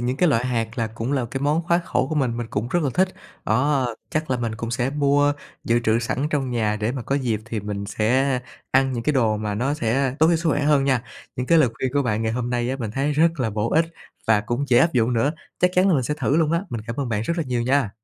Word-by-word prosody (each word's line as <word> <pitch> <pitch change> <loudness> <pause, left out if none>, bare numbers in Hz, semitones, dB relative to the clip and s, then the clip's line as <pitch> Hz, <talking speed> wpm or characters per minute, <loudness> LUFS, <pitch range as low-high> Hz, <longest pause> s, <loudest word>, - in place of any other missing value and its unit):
những 125 +2 -1
cái 175 - +3
loại 120 -4 +2
hạt 115 -1 -2
là 115 - +1
cũng 115 +4 -4
là 130 -4 0
cái 135 - -3
món 150 +4 +1
khoái 170 +1 +2
khẩu 140 - 0
của - - -2
mình, 130 -6 0
mình 120 -1 -3
cũng 110 +4 -2
rất 175 +3 +1
là 140 - 0
thích, 185 +1 +3 0.4
đó. 130 +1 +1 0.2
Chắc 155 -2 -2
là 125 - +2
mình 115 -2 -3
cũng 115 +1 -5
sẽ 125 +1 0
mua 145 0 +2 0.3
dự 120 +1 +2
trữ 110 +1 +3
sẵn 125 +4 -1
trong 135 -3 -1
nhà 110 -3 0
để 110 +3 -1
mà 130 - -4
có 135 - -1
dịp 120 -6 0
thì 110 -2 -4
mình 100 0 -4
sẽ 125 +5 +1 0.3
ăn 135 0 +3
những 120 - -3
cái 150 - +1
đồ 115 -5 +2
mà 105 -1 -3
nó 135 +7 0
sẽ 130 0 0
tốt 160 - +5
cho 170 - +3
sức 165 0 -1
khỏe 145 - +1
hơn 145 -2 +3
nha. 130 -4 +2 0.3
Những 125 0 -2
cái 165 - +5
lời 135 -6 +5
khuyên 130 -1 -3
của 145 - +2
bạn 115 -3 -1
ngày 110 0 0
hôm 120 0 -2
nay 120 0 0
á, 135 - -2
mình 115 -5 -4
thấy 135 +6 0
rất 165 0 +2
là 115 -3 0
bổ 105 +2 -1
ích 160 - +4 0.4
và 110 -2 +4
cũng 120 +6 -2
dễ 120 - +5
áp 165 - +4
dụng 120 -1 +2
nữa. 120 +6 +1 0.3
Chắc 180 0 +3
chắn 185 +2 +4
là 180 - +4
mình 135 - +2
sẽ 150 +5 -1
thử 150 -1 0
luôn 160 -1 +2
á, 170 +2 +1
mình 115 - -3
cảm 115 - -5
ơn 135 -4 -2
bạn 110 -1 -1
rất 170 - -1
là 165 - +1
nhiều 120 -2 -1
nha. 130 -3 +1
125 Hz, 295 wpm, -23 LUFS, 115-145 Hz, 0.4 s, tốt